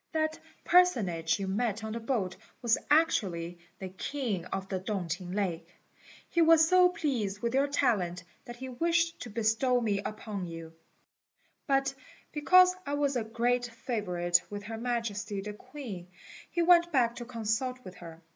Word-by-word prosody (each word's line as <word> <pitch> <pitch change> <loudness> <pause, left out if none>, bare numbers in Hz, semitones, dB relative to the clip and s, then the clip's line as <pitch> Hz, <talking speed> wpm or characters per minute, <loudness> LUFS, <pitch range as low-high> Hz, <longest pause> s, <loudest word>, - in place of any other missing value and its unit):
That 315 0 0 0.2
personage 195 - +3
you 195 - -3
met 215 +2 -1
on 220 0 -4
the 230 - -3
boat 225 -6 -2 0.3
was 235 -2 +4
actually 180 - +2 0.2
the 190 - -6
king 200 -1 -3
of 190 +1 -4
the 190 -1 -2
Tung 190 -2 -3
t'ing 175 +2 -4
lake. 175 -4 -2 0.6
He 340 - +1
was 325 -1 +6
so 365 +1 +6
pleased 250 - -2
with 235 0 0
your 275 +2 +3
talent 195 -11 0 0.2
that 240 - -8
he 260 +2 -7
wished 330 +5 0
to 245 - -7
bestow 230 +3 +2
me 210 -4 0
upon 205 -2 -5
you; 165 -1 -8 0.9
but, 275 -1 +2 0.4
because 365 +5 +5
I 285 -3 -2
was 285 -2 0
a 240 - 0
great 240 +2 0
favourite 205 -7 0
with 205 0 -6
Her 225 +2 -6
Majesty 225 -4 -2
the 210 +2 -5
Queen, 230 -7 -8 0.4
he 345 - 0
went 345 0 +5
back 240 -4 +2
to 240 - -6
consult 235 +2 -2
with 185 - -8
her. 165 -1 -11
230 Hz, 165 wpm, -30 LUFS, 195-275 Hz, 0.9 s, was